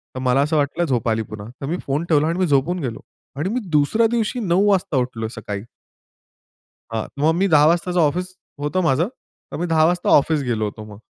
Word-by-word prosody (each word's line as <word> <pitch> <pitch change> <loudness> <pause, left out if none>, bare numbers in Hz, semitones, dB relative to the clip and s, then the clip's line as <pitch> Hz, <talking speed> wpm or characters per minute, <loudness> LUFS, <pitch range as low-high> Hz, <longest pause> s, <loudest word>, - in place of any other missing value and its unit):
तर - - -4
मला 130 +1 +2
असं 150 +2 +1
वाटलं 150 +4 0
झोप 120 -6 0
आली 110 0 +1
पुन्हा. 105 -1 -7
तर - - -3
मी 170 +4 -1
फोन 140 +4 -1
ठेवला 155 -1 +3
आणि 170 +2 -1
मी 185 - +2
झोपून 150 +5 +1
गेलो. 125 -8 -4 0.4
आणि 155 +6 -1
मी 240 +4 -1
दुसऱ्या 150 +10 +3
दिवशी 235 +1 -1
9:00 195 -1 +2
वाजता 185 -7 +1
उठलो 120 -3 -2
सकाळी. 105 -3 -6 1.3
हां. 110 -1 -2
मग 155 +3 +3
मी 190 +3 +2
10:00 150 -4 +5
वाजताचं 175 +2 +1
ऑफिस 180 +4 0 0.3
होतं 150 +6 -1
माझं, 160 +2 +2 0.4
तर - - -5
मी 175 - -2
10:00 160 -1 +3
वाजता 175 +2 +1
ऑफिस 150 +1 +4
गेलो 115 -4 -1
होतो 105 +1 -6
मग. 105 -1 -12
150 Hz, 210 wpm, -21 LUFS, 130-175 Hz, 1.3 s, 10:00